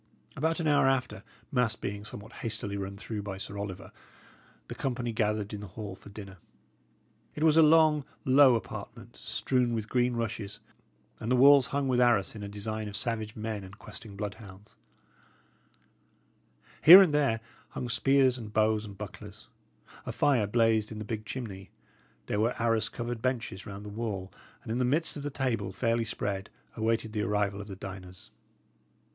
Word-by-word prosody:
About 160 Hz, +4 st, 0 dB
an 165 Hz, -, 0 dB
hour 145 Hz, -2 st, +4 dB
after, 130 Hz, -1 st, 0 dB, 0.3 s
mass 125 Hz, -4 st, +2 dB
being 100 Hz, -2 st, -5 dB
somewhat 105 Hz, +2 st, -9 dB
hastily 105 Hz, -3 st, -3 dB
run 100 Hz, 0 st, -5 dB
through 105 Hz, 0 st, -5 dB
by 100 Hz, -2 st, -6 dB
Sir 100 Hz, +1 st, -7 dB
Oliver, 100 Hz, -1 st, -6 dB, 0.8 s
the -, -, -6 dB
company 120 Hz, -3 st, -3 dB
gathered 105 Hz, -1 st, -1 dB
in 105 Hz, -, -5 dB
the 105 Hz, -, -7 dB
hall 105 Hz, -3 st, -5 dB
for 100 Hz, -, -14 dB
dinner. 100 Hz, -2 st, -10 dB, 1.0 s
It 150 Hz, -, -2 dB
was 155 Hz, -1 st, +5 dB
a 165 Hz, -, +7 dB
long, 155 Hz, -1 st, +5 dB, 0.2 s
low 135 Hz, -1 st, +7 dB
apartment, 115 Hz, -, -7 dB
strewn 125 Hz, -3 st, 0 dB
with 110 Hz, -2 st, -3 dB
green 125 Hz, 0 st, +1 dB
rushes, 105 Hz, -3 st, -4 dB, 0.6 s
and 115 Hz, -, -3 dB
the -, -, +5 dB
walls 140 Hz, +1 st, +7 dB
hung 140 Hz, -1 st, -1 dB
with 125 Hz, -1 st, +2 dB
arras 110 Hz, -8 st, +3 dB
in 105 Hz, -, -8 dB
a 100 Hz, -, -5 dB
design 105 Hz, +1 st, -4 dB
of 105 Hz, -, -7 dB
savage 110 Hz, -1 st, -3 dB
men 110 Hz, -2 st, -4 dB
and 95 Hz, +2 st, -12 dB
questing 105 Hz, -1 st, -8 dB
bloodhounds; 105 Hz, -1 st, -8 dB, 2.1 s
here 175 Hz, +5 st, +12 dB
and 165 Hz, -6 st, 0 dB
there 140 Hz, -7 st, +2 dB, 0.3 s
hung 125 Hz, -, -5 dB
spears 130 Hz, +1 st, +3 dB
and 110 Hz, -3 st, -8 dB
bows 110 Hz, 0 st, +2 dB
and 100 Hz, -2 st, -10 dB
bucklers; 105 Hz, -1 st, -10 dB, 0.6 s
a -, -, -1 dB
fire 125 Hz, -8 st, +2 dB
blazed 110 Hz, 0 st, +2 dB
in 110 Hz, -, -6 dB
the 105 Hz, -, -5 dB
big 110 Hz, 0 st, -4 dB
chimney; 100 Hz, -8 st, -6 dB, 0.6 s
there 105 Hz, -, -1 dB
were 115 Hz, +3 st, 0 dB
arras 115 Hz, -1 st, +1 dB
covered 120 Hz, -1 st, -5 dB
benches 125 Hz, -6 st, -2 dB
round 100 Hz, 0 st, -8 dB
the -, -, -6 dB
wall, 100 Hz, -3 st, -4 dB, 0.3 s
and 110 Hz, -, -6 dB
in 120 Hz, -, -1 dB
the -, -, +2 dB
midst 150 Hz, +3 st, 0 dB
the 145 Hz, -, -3 dB
table, 120 Hz, -8 st, -1 dB
fairly 115 Hz, +3 st, 0 dB
spread, 100 Hz, -2 st, -3 dB, 0.3 s
awaited 110 Hz, -1 st, -1 dB
the 105 Hz, -, -1 dB
arrival 105 Hz, -1 st, 0 dB
of 100 Hz, -, -9 dB
the 100 Hz, -, -7 dB
diners. 95 Hz, -1 st, -10 dB
110 Hz, 175 wpm, -29 LUFS, 100-125 Hz, 2.1 s, here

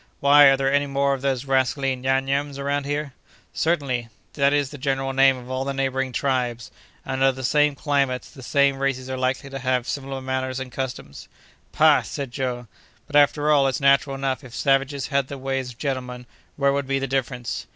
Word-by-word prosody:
"Why, 145 Hz, +1 st, +7 dB
are 135 Hz, -1 st, +6 dB
there 135 Hz, 0 st, 0 dB
any 145 Hz, 0 st, +2 dB
more 140 Hz, 0 st, +1 dB
of 135 Hz, -, -4 dB
those 135 Hz, -1 st, -1 dB
rascally 135 Hz, 0 st, +1 dB
Nyam 135 Hz, +1 st, 0 dB
Nyams 140 Hz, +1 st, -1 dB
around 140 Hz, 0 st, -2 dB
here?" 145 Hz, -1 st, -3 dB, 0.4 s
"Certainly; 140 Hz, -8 st, -1 dB, 0.3 s
that 140 Hz, -1 st, +2 dB
is 145 Hz, -1 st, 0 dB
the 145 Hz, -, -9 dB
general 135 Hz, 0 st, -1 dB
name 135 Hz, 0 st, +4 dB
of 125 Hz, 0 st, -10 dB
all 130 Hz, 0 st, -1 dB
the 135 Hz, 0 st, -3 dB
neighboring 135 Hz, -1 st, -1 dB
tribes, 125 Hz, -3 st, -2 dB, 0.3 s
and, 130 Hz, 0 st, -3 dB
under 135 Hz, 0 st, +5 dB
the 130 Hz, 0 st, -8 dB
same 150 Hz, +3 st, +2 dB
climates, 140 Hz, -3 st, -1 dB
the 135 Hz, -, -13 dB
same 140 Hz, +1 st, +2 dB
races 130 Hz, -1 st, -2 dB
are -, -, -2 dB
likely 130 Hz, +1 st, -2 dB
to 135 Hz, -, -5 dB
have 130 Hz, -1 st, 0 dB
similar 135 Hz, -1 st, -4 dB
manners 130 Hz, 0 st, -3 dB
and 130 Hz, -1 st, -7 dB
customs." 125 Hz, -, -6 dB, 0.4 s
"Pah!" -, -, +5 dB
said 140 Hz, -3 st, -6 dB
Joe, 125 Hz, -2 st, -3 dB, 0.4 s
"but, 145 Hz, -, -8 dB
after 145 Hz, +1 st, +4 dB
all, 140 Hz, -2 st, +4 dB
it's 130 Hz, -, -1 dB
natural 140 Hz, 0 st, +3 dB
enough. 135 Hz, 0 st, -2 dB
If 125 Hz, -2 st, -11 dB
savages 135 Hz, 0 st, 0 dB
had 140 Hz, -2 st, +1 dB
the 140 Hz, -, -7 dB
ways 135 Hz, -1 st, -3 dB
of 120 Hz, -, -12 dB
gentlemen, 125 Hz, -3 st, -4 dB, 0.3 s
where 140 Hz, -1 st, +2 dB
would 140 Hz, -1 st, -2 dB
be 135 Hz, 0 st, 0 dB
the 135 Hz, -, -2 dB
difference? 125 Hz, -2 st, -3 dB
135 Hz, 205 wpm, -23 LUFS, 130-140 Hz, 0.4 s, Why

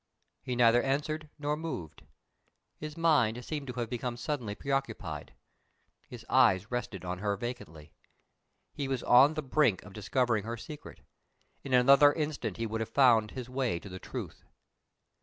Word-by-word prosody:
He 125 Hz, -, -3 dB
neither 120 Hz, 0 st, +5 dB
answered 150 Hz, +3 st, -2 dB
nor 150 Hz, 0 st, -1 dB
moved. 135 Hz, -, -6 dB, 0.7 s
His 155 Hz, +1 st, -8 dB
mind 125 Hz, -8 st, +2 dB
seemed 150 Hz, -3 st, -4 dB
to 125 Hz, -, -5 dB
have 120 Hz, -1 st, -3 dB
become 120 Hz, +1 st, -4 dB
suddenly 125 Hz, -5 st, -3 dB
preoccupied; 110 Hz, -, -4 dB, 0.7 s
his -, -, -10 dB
eyes 95 Hz, +4 st, +3 dB
rested 110 Hz, -6 st, -4 dB
on 90 Hz, 0 st, -4 dB
her 100 Hz, 0 st, -1 dB
vacantly. 85 Hz, -10 st, -7 dB, 0.8 s
He 140 Hz, -, -3 dB
was 135 Hz, -2 st, -2 dB
on 135 Hz, +5 st, +6 dB
the 155 Hz, -, -3 dB
brink 130 Hz, -7 st, +2 dB
of 100 Hz, -, -13 dB
discovering 115 Hz, +1 st, 0 dB
her 115 Hz, +2 st, -5 dB
secret; 150 Hz, +5 st, -10 dB, 0.6 s
in 130 Hz, -2 st, +1 dB
another 140 Hz, +3 st, +7 dB
instant 155 Hz, -2 st, -3 dB
he 115 Hz, -, -2 dB
would 115 Hz, 0 st, -3 dB
have 110 Hz, -, -3 dB
found 115 Hz, -4 st, +4 dB
his 125 Hz, 0 st, -7 dB
way 125 Hz, -7 st, -1 dB
to 100 Hz, -, -11 dB
the 95 Hz, 0 st, -8 dB
truth. -, -, -7 dB
125 Hz, 160 wpm, -30 LUFS, 110-140 Hz, 0.8 s, another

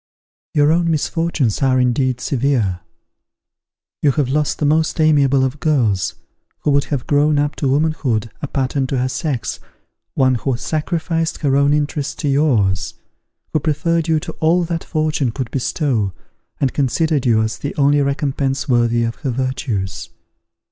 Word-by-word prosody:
"Your 145 Hz, 0 st, +4 dB
own 170 Hz, +1 st, +2 dB
misfortunes 160 Hz, -, 0 dB
are 130 Hz, -1 st, +3 dB
indeed 125 Hz, 0 st, +1 dB
severe. 125 Hz, -10 st, 0 dB, 1.2 s
You 145 Hz, -, +4 dB
have 140 Hz, -3 st, 0 dB
lost 150 Hz, +2 st, 0 dB
the 150 Hz, -, -1 dB
most 155 Hz, +2 st, +1 dB
amiable 140 Hz, -4 st, +4 dB
of 130 Hz, +2 st, -2 dB
girls, 115 Hz, -, +1 dB, 0.5 s
who 150 Hz, -, +1 dB
would 140 Hz, 0 st, +2 dB
have 140 Hz, -4 st, -3 dB
grown 145 Hz, +1 st, +2 dB
up 145 Hz, 0 st, 0 dB
to 140 Hz, -, -1 dB
womanhood 135 Hz, -6 st, 0 dB
a 145 Hz, -, -3 dB
pattern 135 Hz, 0 st, -1 dB
to 135 Hz, -, -2 dB
her 125 Hz, +1 st, +1 dB
sex, 130 Hz, -1 st, -3 dB, 0.6 s
one 130 Hz, -1 st, +3 dB
who 130 Hz, -3 st, -1 dB
sacrificed 165 Hz, +3 st, -2 dB
her 135 Hz, -2 st, +2 dB
own 140 Hz, +1 st, +3 dB
interests 150 Hz, 0 st, -1 dB
to 150 Hz, -, -3 dB
yours: 115 Hz, -, +1 dB, 0.6 s
who 155 Hz, -, +3 dB
preferred 160 Hz, +3 st, 0 dB
you 160 Hz, -1 st, +2 dB
to -, -, -6 dB
all 170 Hz, +3 st, +3 dB
that 165 Hz, -1 st, -3 dB
fortune 155 Hz, -4 st, 0 dB
could 125 Hz, 0 st, -5 dB
bestow, 125 Hz, -, -1 dB, 0.5 s
and 135 Hz, -2 st, 0 dB
considered 145 Hz, 0 st, +1 dB
you 110 Hz, -2 st, +3 dB
as 110 Hz, +1 st, -3 dB
the 140 Hz, -, -4 dB
only 145 Hz, 0 st, +3 dB
recompense 140 Hz, -1 st, -1 dB
worthy 120 Hz, -2 st, +2 dB
of 115 Hz, 0 st, -2 dB
her 140 Hz, -, -3 dB
virtues. 125 Hz, -7 st, -3 dB
140 Hz, 155 wpm, -19 LUFS, 125-150 Hz, 1.2 s, Your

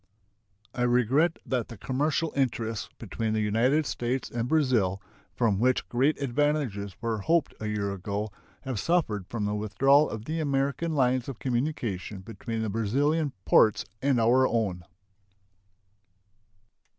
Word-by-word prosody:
I 120 Hz, -, -4 dB
regret 125 Hz, +7 st, +3 dB
that 125 Hz, -4 st, -1 dB
the 115 Hz, -, -10 dB
commercial 145 Hz, +7 st, -1 dB
interests 115 Hz, -5 st, -1 dB
between 110 Hz, -1 st, -3 dB
the 110 Hz, -, +1 dB
United 120 Hz, +9 st, +2 dB
States 125 Hz, 0 st, -2 dB
and 120 Hz, 0 st, -2 dB
Brazil, 125 Hz, -11 st, +2 dB, 0.4 s
from 110 Hz, -5 st, +1 dB
which 130 Hz, +2 st, +2 dB
great 135 Hz, +5 st, +2 dB
advantages 135 Hz, -7 st, -1 dB
were 115 Hz, -2 st, -1 dB
hoped 165 Hz, +10 st, +1 dB
a 110 Hz, -, -4 dB
year 100 Hz, -2 st, -1 dB
ago, 100 Hz, +2 st, -4 dB, 0.3 s
have 130 Hz, -6 st, -3 dB
suffered 110 Hz, -, 0 dB
from 110 Hz, -3 st, -3 dB
the 105 Hz, -, -1 dB
withdrawal 130 Hz, +8 st, +3 dB
of 110 Hz, 0 st, -6 dB
the 160 Hz, +3 st, -2 dB
American 140 Hz, +2 st, 0 dB
lines 130 Hz, -2 st, +2 dB
of 130 Hz, -, -6 dB
communication 120 Hz, -, -2 dB
between 115 Hz, +2 st, -5 dB
the 110 Hz, -, -2 dB
Brazilian 140 Hz, +8 st, +1 dB
ports 110 Hz, -2 st, +4 dB, 0.2 s
and 135 Hz, -3 st, +2 dB
our 125 Hz, +3 st, +4 dB
own. 95 Hz, -7 st, -1 dB
120 Hz, 140 wpm, -27 LUFS, 105-140 Hz, 0.4 s, ports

